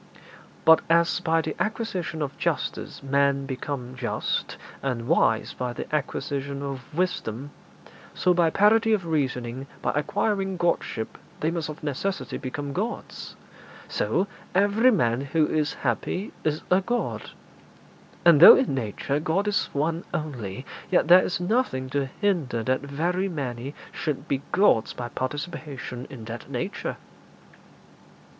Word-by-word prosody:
But 160 0 +8
as 170 +1 +4
by 165 -2 +2
the - - -3
acquisition 190 -8 -2
of 140 -1 -4
justice - - -2
men 140 0 +2
become 130 -1 -4
just, 125 -2 -2 0.2
and 120 -4 -2
wise 125 -8 +2
by 125 -1 -3
the - - -5
acquisition 140 -1 -2
of 135 -1 -6
wisdom, 145 -6 -2 0.6
so 180 - +3
by 170 -2 +3
parity 220 +5 +4
of 195 -5 0
reasoning 130 -4 -2 0.2
by - - +2
acquiring 195 +5 0
Godship 170 -9 -1 0.2
they 160 - +1
must 165 -3 -3
of 155 +1 -8
necessity 170 +7 -2
become 140 +1 -4
gods. 215 +8 -4 0.5
So 190 - 0 0.3
every 205 +5 +5
man 120 - +2
who 150 +3 +2
is 150 -1 0
happy 155 - -1
is 155 0 -1
a 185 +1 +5
god; 240 +5 -2 1.0
and 170 -4 +8
though - - +12
in 260 - +1
nature 130 +3 -1
God 170 +7 0
is 205 - +1
One 160 +4 -1
only, 130 -7 -4 0.2
yet 175 -3 +3
there 180 +1 +9
is 175 - -1
nothing 180 - 0
to 140 -1 0
hinder 155 - +1
that 130 +2 +1
very 170 +7 -1
many 135 -4 -4 0.2
should 145 0 -3
be 140 -1 0
gods 175 - +4
by 120 -1 -5
participation 140 -2 -5
in 115 -5 -9
that 120 +4 -7
nature.' 155 +10 -3
150 Hz, 135 wpm, -26 LUFS, 130-180 Hz, 1.0 s, though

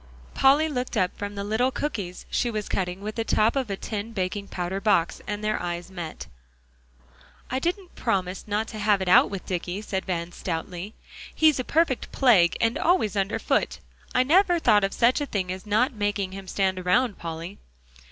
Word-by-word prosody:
Polly 285 +4 +4
looked 250 -5 -3
up 185 -3 +1
from 205 0 -5
the 200 - -3
little 220 +5 +1
cookies 210 -11 -4
she 240 - +1
was 215 -2 -3
cutting 180 0 -2
with 215 +1 -4
the 225 - -2
top 225 +1 +2
of 265 -5 -1
a 195 - -2
tin 215 +2 -5
baking 200 +1 -2
powder 185 +2 -3
box 185 -6 +2
and 205 0 -4
their 215 0 0
eyes 175 +1 -4
met. 170 -4 -6 1.3
"I 260 - 0
didn't 355 +4 -3
promise 190 -4 -2
not 210 +2 -1
to 215 - -7
have 205 -2 +2
it - - -6
out 180 - +6
with 195 -2 -6
Dicky," 180 +1 -3
said 190 -3 -3
Van 170 -2 -2
stoutly. 175 +4 -5 0.4
"He's 310 -3 +4
a - - 0
perfect 310 -2 +1
plague, 205 -11 +4
and 230 +1 +1
always 330 - +2
under 195 +1 0
foot. - - 0 0.4
I 250 - +5
never 350 +5 +4
thought 210 -10 +4
of 195 - +1
such 245 +5 +3
a 290 - -2
thing 185 -6 -2
as 185 +3 -7
not 235 +7 +2
making 205 -3 -1
him 195 0 -8
stand 190 0 0
around, 210 +5 +1
Polly." 165 +3 -6
205 Hz, 190 wpm, -25 LUFS, 185-245 Hz, 1.3 s, out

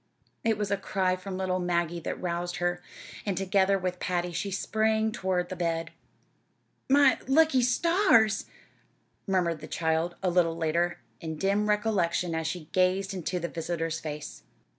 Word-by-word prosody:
It 225 -2 +2
was 205 -1 -2
a 200 - +2
cry 185 -2 0
from 185 0 -6
little 185 -1 0
Maggie 175 -1 0
that - - -4
roused 175 0 -2
her, 175 0 -1 0.4
and 195 -4 -2
together 195 +1 +2
with 180 -1 -3
Patty 175 -1 -1
she 200 +4 -3
sprang 220 +2 +1
toward 185 -5 -1
the 185 - -4
bed. 165 -2 -2 1.0
"My 275 -1 +5
lucky 275 -1 +4
stars!" 250 - +3 0.8
murmured 175 -4 +1
the 155 - -9
child, 160 +1 0
a 185 - +2
little 170 -2 +2
later, 170 +2 0 0.2
in 160 -2 -5
dim 200 +5 +1
recollection 195 -5 +1
as 160 -1 -1
she 160 0 -4
gazed 190 +2 +2
into 180 0 -2
the 170 - -2
visitor's 165 -1 -3
face. 150 - -7
185 Hz, 155 wpm, -28 LUFS, 170-200 Hz, 1.0 s, My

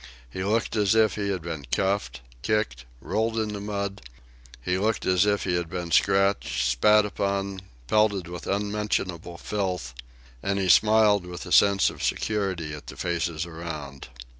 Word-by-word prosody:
He 95 - -4
looked 110 +3 0
as 105 -1 +3
if 110 -1 +4
he 100 -1 -2
had 95 -4 -2
been 80 -4 -5
cuffed, 95 -11 -1 0.2
kicked, 70 - -1 0.2
rolled 110 +1 -1
in 110 -1 -1
the 100 - -5
mud; 100 -1 -4 0.6
he 90 +9 -1
looked 110 +2 0
as 90 +2 +3
if 105 -1 +1
he 90 - -1
had 85 -2 -3
been 85 -1 -5
scratched, 80 -11 +2
spat 105 +12 +4
upon, 100 -1 -2 0.2
pelted 100 - +2
with 90 0 -8
unmentionable 100 -4 -2
filth... 90 -11 -3 0.5
and 100 0 -1
he 95 -2 0
smiled 105 -2 +5
with 90 +1 -7
a 90 - -9
sense 100 0 +5
of - - -11
security 95 -8 -1
at 75 -1 -9
the - - -9
faces 85 -1 -2
around. 80 -5 -7
95 Hz, 165 wpm, -26 LUFS, 85-105 Hz, 0.6 s, smiled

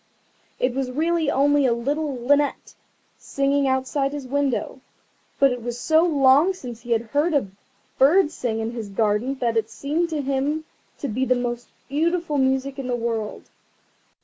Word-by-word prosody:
It 250 0 0
was 265 0 -2
really 320 +3 0
only 285 0 +3
a 240 - +3
little 280 +4 -2
linnet 285 +4 +1 0.5
singing 275 0 0
outside 265 +2 0
his 290 -2 -5
window, 270 -1 -1 0.6
but 275 -1 +4
it 250 -1 -4
was 240 +1 -5
so 315 +5 +3
long 295 +2 +4
since 240 -9 -9
he 240 - -13
had 230 0 0
heard 295 +7 0
a 275 -8 +1 0.5
bird 305 +4 +5
sing 235 -8 -3
in 225 +1 -3
his 230 -4 -6
garden 215 +6 0
that 235 -3 -1
it 220 0 0
seemed 300 +9 -2
to 310 -3 -2
him 280 +3 -1 0.3
to 280 - -4
be 255 +3 -1
the 255 -1 +2
most 240 -1 -3 0.2
beautiful 320 +1 0
music 265 +1 0
in 265 - -4
the 250 - 0
world. 230 -3 -4
270 Hz, 170 wpm, -23 LUFS, 240-290 Hz, 0.6 s, bird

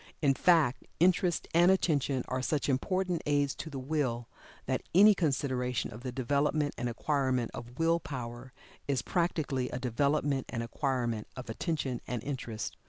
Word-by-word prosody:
In 140 -3 +3
fact 155 -4 +3
interest 175 0 +3
and 170 +2 +6
attention 145 -8 +2
are 130 0 -2
such 145 +2 0
important 180 +6 0
aids 145 -1 +2
to 160 - -7
the 140 - -6
Will, 130 -4 -1 0.4
that - - -1
any 210 +3 +8
consideration 130 - -1
of 110 - -9
the 130 0 -4
development 145 +3 +1
and 120 0 -2
acquirement 130 -1 0
of 120 +1 -9
Will 165 +1 +3
power 125 -3 -7 0.4
is 140 -2 0
practically 155 -7 0
a - - -4
development 140 +2 0
and 115 -2 -3
acquirement 120 -3 -1
of 125 -3 -6
attention 135 -2 -2
and 120 -3 -3
interest. 125 -6 -4
135 Hz, 155 wpm, -31 LUFS, 125-155 Hz, 0.4 s, any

